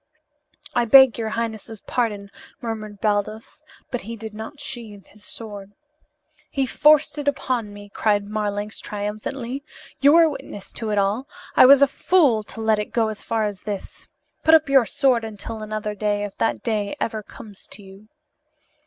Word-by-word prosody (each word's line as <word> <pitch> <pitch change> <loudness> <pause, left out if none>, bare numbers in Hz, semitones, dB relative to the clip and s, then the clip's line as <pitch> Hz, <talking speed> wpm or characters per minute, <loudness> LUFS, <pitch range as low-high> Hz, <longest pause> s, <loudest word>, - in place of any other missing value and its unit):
"I 240 - +2
beg 265 0 +7
your 220 -1 -2
highness's 220 -1 -4
pardon," 205 -5 -2 0.3
murmured 215 -4 -6
Baldos, 215 +5 -2 0.3
but 245 - -2
he 230 +3 -7
did 220 -1 -8
not 220 +7 -8
sheathe 230 -8 -8
his 210 0 -17
sword. 205 -3 -9 0.8
"He 270 -1 0
forced 300 +2 +4
it 290 - -5
upon 255 -6 -1
me," 205 0 -11
cried 205 -2 +1
Marlanx 210 0 -3
triumphantly. 215 +6 -5 0.4
"You 285 +2 +6
were 335 0 +7
witness 205 -9 -7
to 225 - -4
it 210 - 0
all. 205 +7 0 0.3
I - - +8
was 280 +1 +8
a - - +6
fool 280 -6 +3
to 225 - -11
let 220 -1 +2
it 210 - -5
go 225 -2 +2
as 215 - -7
far 225 -1 -1
as 205 -3 -5
this. 205 -3 -7 0.4
Put 320 0 +7
up 315 -1 +3
your 270 -4 +5
sword 255 -4 +2
until 220 0 -7
another 215 0 -4
day 205 0 -1
if 205 -1 -6
that 225 - 0
day 210 -3 -1
ever 220 -1 -2
comes 205 0 -13
to 205 - -10
you." 195 +2 -15
220 Hz, 170 wpm, -23 LUFS, 205-245 Hz, 0.8 s, I